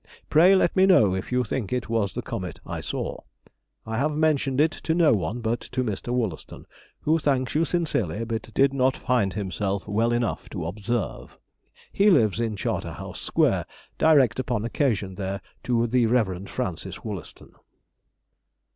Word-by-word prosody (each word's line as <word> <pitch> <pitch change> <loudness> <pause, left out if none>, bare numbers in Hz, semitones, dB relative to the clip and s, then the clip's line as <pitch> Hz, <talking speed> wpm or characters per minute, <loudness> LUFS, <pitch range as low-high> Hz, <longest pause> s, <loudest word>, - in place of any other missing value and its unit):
Pray 180 +5 +7
let 185 - +2
me 190 0 +5
know 110 - +5
if 95 +5 -4
you 125 0 +2
think 110 -3 -3
it 125 -1 -1
was 110 -5 -1
the - - -3
comet - - -5
I - - -5
saw. - - -4 0.7
I 110 +1 -3
have 150 +3 +1
mentioned 150 -3 +1
it 155 +1 +4
to 160 - -2
no 165 -8 +5
one 110 +3 -2
but 115 +1 -1
to 130 - -3
Mr. 110 +1 -3
Wollaston, 115 -10 -3 0.4
who 160 +2 +2
thanks 135 -4 0
you 160 +2 +2
sincerely, 115 - -1
but 115 0 -4
did 135 0 +4
not 130 -1 +2
find 120 -6 +1
himself 100 0 -3
well 110 +3 +1
enough 120 -1 -1
to 90 -6 -5
observe; 105 +5 -4 0.5
he 205 +1 +4
lives 115 - +3
in 115 -2 -1
Charter - - -3
House - - -8
Square; - - +1 0.3
direct 135 -7 +4
upon 120 -4 -1
occasion 110 -7 0
there 95 0 -4 0.3
to 120 -1 +2
the 120 0 +2
Rev. 100 -5 0
Francis 95 -10 -4
Wollaston. - - -8
120 Hz, 165 wpm, -25 LUFS, 105-135 Hz, 0.7 s, Pray